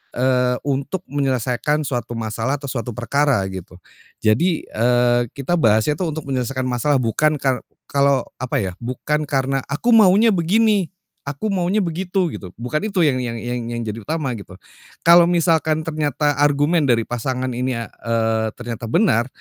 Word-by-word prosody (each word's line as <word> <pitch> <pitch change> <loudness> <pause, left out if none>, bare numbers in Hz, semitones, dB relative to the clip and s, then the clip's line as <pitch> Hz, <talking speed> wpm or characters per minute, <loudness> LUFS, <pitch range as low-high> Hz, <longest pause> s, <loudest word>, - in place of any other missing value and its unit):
eee, 125 0 +2
untuk 140 +7 -2
menyelesaikan 135 +1 0
suatu 120 -4 -3
masalah 115 +4 -2
atau 140 -2 -6
suatu 120 -3 -4
perkara, 135 -2 +1
gitu. 95 -1 -9 0.5
Jadi, 155 +11 +2
eee, 120 +1 +2
kita 155 +5 -1
bahasnya 110 - +2
tuh 165 -5 -2
untuk 155 - -5
menyelesaikan 130 0 -1
masalah, 130 +3 0
bukan 135 +5 +1
kar 130 -2 0 0.3
kalau, 140 -2 +3 0.2
apa 130 +3 -3
ya, 95 - -3
bukan 145 +5 -2
karena, 135 -1 0
"Aku 165 +13 0
maunya 220 0 +6
begini. 200 +2 +2 0.4
Aku 145 +10 -3
maunya 190 +2 +1
begitu," 180 +1 -1
gitu. 95 - -7
Bukan 150 - -2
itu 195 -5 +1
yang 135 -5 +2
yang 120 -2 -3
yang 120 0 -4
yang 120 0 -4
jadi 110 +1 -5
utama 150 +3 -3
gitu. 95 -2 -12 0.5
Kalau 170 0 +7
misalkan 160 -2 +2
ternyata 150 -2 -1
argumen 145 +2 +3
dari 115 -3 +3
pasangan 125 +2 -3
ini 125 +1 -2
a 115 -2 -5
eee, 115 -1 -1
ternyata 120 -1 -6
benar, 120 - +2
135 Hz, 160 wpm, -20 LUFS, 120-160 Hz, 0.5 s, Kalau